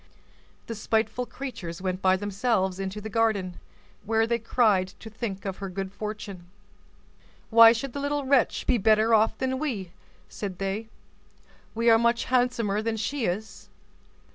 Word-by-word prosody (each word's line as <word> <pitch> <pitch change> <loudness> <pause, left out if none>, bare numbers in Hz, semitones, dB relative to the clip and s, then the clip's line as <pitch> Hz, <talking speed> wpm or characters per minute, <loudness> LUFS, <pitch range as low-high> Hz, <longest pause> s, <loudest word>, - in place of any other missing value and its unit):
The 230 - -5
spiteful 220 +2 -1
creatures 220 -11 -7
went 185 0 -3
by 185 0 +4
themselves 195 -1 -1
into 195 +2 -4
the 215 - -6
garden, 210 -5 0 0.4
where 225 +1 +2
they 235 +1 0
cried 215 -5 +2
to 220 - -10
think 205 -3 -5
of 190 -1 -3
her 195 -1 -5
good 190 +1 -5
fortune. 200 -3 -7 1.0
"Why 230 0 +9
should 240 +2 -3
the 285 - -4
little 285 0 -1
wretch 265 -3 +2
be 245 - +2
better 220 +2 +4
off 220 0 +3
than 260 0 -1
we?" 215 - -3 0.4
said 195 -4 -6
they. 195 +3 -3 0.9
"We 230 +1 0
are 225 - +6
much 235 0 +2
handsomer 245 -5 +1
than 225 0 -2
she 240 +4 -2
is." 210 +4 -4
220 Hz, 155 wpm, -26 LUFS, 195-235 Hz, 1.0 s, Why